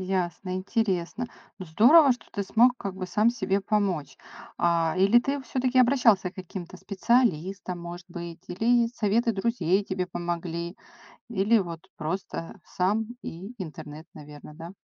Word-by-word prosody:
Ясно, 185 0 -2
интересно. 190 +3 -1 0.3
Ну, 185 - -7
здорово, 255 - +6
что 245 - -10
ты 205 -3 -3
смог 245 +5 +4
как 195 -2 -5
бы 190 - -5
сам 215 +5 +3
себе 200 -4 -1
помочь, 195 -8 -1 0.4
а 170 -1 +2
Или 200 +5 +5
ты 275 +3 -2
всё-таки 255 0 0
обращался 235 -8 +4
к - - -28
каким-то 185 -1 -8
специалистам, 190 -4 0
может 175 +1 -8
быть, 170 -1 -7
или 230 +6 +2
советы 230 +3 +1
друзей 195 -3 +1
тебе 185 -2 -2
помогли, 170 0 -4 0.5
или 215 +1 +3
вот 170 -3 -6
просто 165 +2 -5
сам 205 +5 0 0.2
и 190 +8 -8
интернет, 155 0 -10
наверно, 150 0 -12
да? 170 +1 -9
190 Hz, 140 wpm, -26 LUFS, 170-225 Hz, 0.5 s, здорово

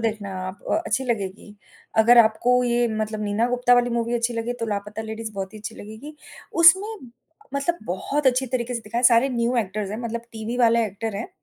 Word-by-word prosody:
देखना 215 -3 -2 0.2
आप 185 +2 -8 0.2
अच्छी 260 +5 0
लगेगी, 205 -3 -4 0.4
अगर 235 +2 +7
आपको 230 +2 +4
ये 240 0 +2
मतलब 215 0 -3
नीना 210 +3 0
गुप्ता 245 0 +3
वाली 245 0 +2
मूवी 235 0 -1
अच्छी 235 0 0
लगे 230 +1 -2
तो - - 0
लापता 210 +1 -4
लेडीज़ 220 0 -6
बहुत 195 -1 -5
ही - - -8
अच्छी 210 - -7
लगेगी। 220 +9 -10 0.5
उसमें 380 +5 +7 0.7
मतलब 335 +5 -1
बहुत 275 +10 -2
अच्छी 260 +1 +3
तरीके 245 -1 -2
से 235 - -3
दिखाया, 235 +3 -3
सारे 245 +1 +5
न्यू 235 +1 +1
एक्टर्स 205 -2 -2
हैं, 210 - -4
मतलब 235 -1 -4
टीवी 225 +2 -5
वाले 235 -1 +4
एक्टर 210 +1 -5
हैं 215 - -5
230 Hz, 195 wpm, -23 LUFS, 215-245 Hz, 0.7 s, अगर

